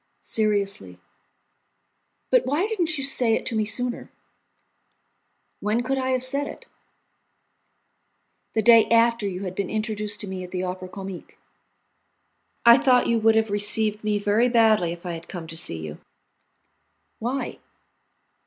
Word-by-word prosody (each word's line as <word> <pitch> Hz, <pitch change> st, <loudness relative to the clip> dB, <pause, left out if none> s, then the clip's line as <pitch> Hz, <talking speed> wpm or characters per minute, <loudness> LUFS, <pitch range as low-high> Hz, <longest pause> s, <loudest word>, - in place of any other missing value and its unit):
"Seriously." 210 Hz, -1 st, -1 dB, 1.3 s
"But -, -, +3 dB
why 295 Hz, +8 st, +1 dB
didn't 350 Hz, -7 st, 0 dB
you 275 Hz, -, -2 dB
say 245 Hz, -4 st, +3 dB
it -, -, -4 dB
to 230 Hz, -, -3 dB
me 215 Hz, -1 st, +1 dB
sooner?" 245 Hz, +3 st, -3 dB, 1.5 s
"When 220 Hz, +3 st, 0 dB
could 265 Hz, +2 st, -1 dB
I 260 Hz, 0 st, -1 dB
have 255 Hz, -1 st, 0 dB
said 280 Hz, +2 st, +1 dB
it?" -, -, -10 dB, 1.9 s
"The 220 Hz, -, 0 dB
day 230 Hz, 0 st, +7 dB
after 230 Hz, -2 st, +3 dB
you 185 Hz, 0 st, -5 dB
had 185 Hz, -2 st, -4 dB
been 190 Hz, 0 st, -3 dB
introduced 215 Hz, -1 st, -2 dB
to 205 Hz, -, -4 dB
me 190 Hz, -1 st, -5 dB
at 180 Hz, -, -9 dB
the 180 Hz, 0 st, -3 dB
Opera 185 Hz, 0 st, -5 dB
Comique." 190 Hz, -1 st, -9 dB, 1.3 s
"I 235 Hz, +2 st, +8 dB
thought 255 Hz, -3 st, +4 dB
you 230 Hz, -1 st, +1 dB
would 220 Hz, 0 st, +4 dB
have 220 Hz, -1 st, +1 dB
received 210 Hz, +1 st, +1 dB
me 210 Hz, -1 st, 0 dB
very 205 Hz, +4 st, +2 dB
badly 220 Hz, -7 st, +3 dB
if 175 Hz, +1 st, -9 dB
I 175 Hz, -, -3 dB
had 165 Hz, 0 st, -9 dB
come 175 Hz, -3 st, -7 dB
to 160 Hz, 0 st, -8 dB
see 160 Hz, -, -4 dB
you." 80 Hz, -1 st, -8 dB, 1.2 s
"Why?" 245 Hz, +2 st, -4 dB
215 Hz, 150 wpm, -24 LUFS, 195-245 Hz, 1.9 s, I